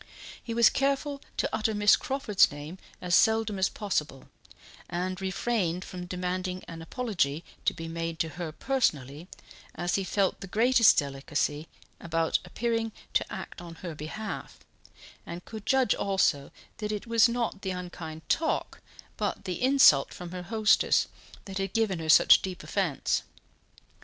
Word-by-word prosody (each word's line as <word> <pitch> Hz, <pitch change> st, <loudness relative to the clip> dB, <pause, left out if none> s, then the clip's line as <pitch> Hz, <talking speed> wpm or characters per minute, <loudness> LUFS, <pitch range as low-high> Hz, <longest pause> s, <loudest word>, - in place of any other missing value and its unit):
He 230 Hz, -, -5 dB
was 235 Hz, -1 st, +6 dB
careful 280 Hz, +1 st, 0 dB, 0.2 s
to -, -, +1 dB
utter 220 Hz, 0 st, 0 dB
Miss 205 Hz, 0 st, +6 dB
Crawford's 265 Hz, -, +2 dB
name 150 Hz, +5 st, -8 dB, 0.2 s
as 180 Hz, -1 st, -2 dB
seldom 220 Hz, -1 st, +3 dB
as 190 Hz, -, +3 dB
possible, 150 Hz, -10 st, -3 dB, 0.6 s
and 185 Hz, +2 st, -3 dB
refrained 190 Hz, -2 st, -1 dB
from 180 Hz, -1 st, -7 dB
demanding 180 Hz, 0 st, -3 dB
an 165 Hz, -1 st, -8 dB
apology 170 Hz, -, -1 dB, 0.2 s
to -, -, +3 dB
be 165 Hz, -, -6 dB
made 165 Hz, 0 st, -4 dB
to 160 Hz, -, -1 dB
her 165 Hz, +1 st, -5 dB
personally, 155 Hz, -, -1 dB, 0.5 s
as 175 Hz, 0 st, -2 dB
he 195 Hz, -, +1 dB
felt 190 Hz, +1 st, 0 dB
the 195 Hz, -, -6 dB
greatest 230 Hz, +3 st, +5 dB
delicacy 145 Hz, +2 st, -1 dB, 0.3 s
about 165 Hz, -1 st, 0 dB
appearing 225 Hz, +4 st, -2 dB, 0.2 s
to -, -, 0 dB
act -, -, -7 dB
on 170 Hz, -1 st, -9 dB
her 170 Hz, -, -4 dB
behalf, 160 Hz, +9 st, -6 dB, 0.7 s
and 175 Hz, +1 st, -8 dB
could 220 Hz, -2 st, -9 dB
judge 265 Hz, -5 st, +3 dB
also 180 Hz, -8 st, +1 dB, 0.3 s
that 210 Hz, -1 st, -3 dB
it 210 Hz, -1 st, -4 dB
was 230 Hz, 0 st, +4 dB
not 235 Hz, -4 st, -2 dB
the 190 Hz, -, -3 dB
unkind 175 Hz, -3 st, -7 dB
talk, 320 Hz, -1 st, -1 dB, 0.4 s
but -, -, -3 dB
the 180 Hz, -2 st, -4 dB
insult 265 Hz, -, +5 dB
from 175 Hz, -1 st, -8 dB
her 180 Hz, 0 st, -5 dB
hostess, 215 Hz, +4 st, +3 dB, 0.4 s
that 195 Hz, 0 st, -5 dB
had 195 Hz, 0 st, -3 dB
given 220 Hz, -6 st, +1 dB
her 160 Hz, -1 st, -5 dB
such -, -, +7 dB
deep 190 Hz, -1 st, -6 dB
offence. 185 Hz, -9 st, 0 dB
185 Hz, 150 wpm, -28 LUFS, 165-220 Hz, 0.7 s, such